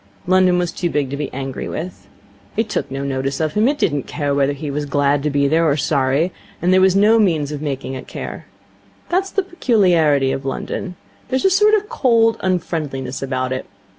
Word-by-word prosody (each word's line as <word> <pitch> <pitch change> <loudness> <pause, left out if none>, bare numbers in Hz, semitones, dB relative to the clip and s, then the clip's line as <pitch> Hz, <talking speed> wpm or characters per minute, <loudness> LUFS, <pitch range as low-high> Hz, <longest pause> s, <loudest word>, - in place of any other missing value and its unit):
London 185 0 +4
was 175 -1 0
too 175 - -2
big 145 -4 -1
to - - -2
be 145 -1 -4
angry 135 0 -5
with. 175 +3 -6 0.5
It 225 0 0
took 175 - -2
no 135 +1 -4
notice 135 0 -2
of 155 -1 -1
him. 215 +3 +3
It 290 +2 +1
did 160 - +1
not 145 - -3
care 145 -3 -2
whether 140 0 +2
he 145 +1 -5
was 145 +1 -3
glad 140 0 +1
to 150 - 0
be 140 0 +2
there 160 +3 +2
or 145 - +1
sorry, 140 +3 +1 0.3
and 180 +2 +2
there 185 - +5
was 190 0 +4
no 215 +3 +5
means 160 -8 +1
of 150 -1 -5
making 135 -3 -4
it 130 - -7
care. - - -7 0.6
That 370 +2 +1
is 390 - -9
the 395 - 0
peculiarity 180 - +2
of 135 - -3
London. 180 +7 -4 0.3
There 260 - 0
is 265 - -2
a 385 - +5
sort 420 +3 +5
of 415 -1 -1
cold 230 - +2
unfriendliness 155 -8 -2
about 130 -1 -2
it. 130 - -5
155 Hz, 220 wpm, -19 LUFS, 140-195 Hz, 0.6 s, there